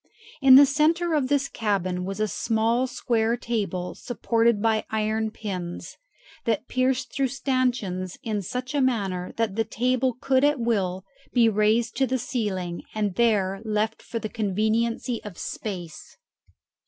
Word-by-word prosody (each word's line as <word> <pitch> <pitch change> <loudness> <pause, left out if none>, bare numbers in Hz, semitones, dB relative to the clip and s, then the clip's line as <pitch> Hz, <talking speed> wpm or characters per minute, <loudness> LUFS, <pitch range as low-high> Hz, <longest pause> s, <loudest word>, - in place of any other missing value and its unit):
In 265 -1 +9
the 280 +2 +10
centre 320 +4 +2
of 290 -4 +2
this 280 0 +1
cabin 185 -6 -1
was 195 +2 -5
a 215 - +1
small 225 +5 +1
square 235 -2 0
table 205 -7 -2
supported 230 -1 +1
by 220 0 +2
iron 220 0 0
pins, 185 -5 -6 0.5
that 230 +1 0
pierced 255 0 0
through 270 -1 +1
stanchions 245 -8 -1
in 215 -2 -2
such 250 - -5
a 290 - +2
manner 195 -8 0
that 225 -4 0
the 225 - +2
table 250 +3 0
could 265 0 +2
at 290 -1 +3
will 195 -5 -1 0.3
be 235 -2 +5
raised 220 +2 +2
to 265 - +2
the 260 +2 0
ceiling, 205 -8 -3
and 210 -3 0
there 195 -3 +1
left 215 0 -1
for 230 - -5
the 225 - -3
conveniency 220 +3 -1
of 205 -5 -9
space. 175 -7 -6
225 Hz, 150 wpm, -25 LUFS, 205-250 Hz, 0.5 s, the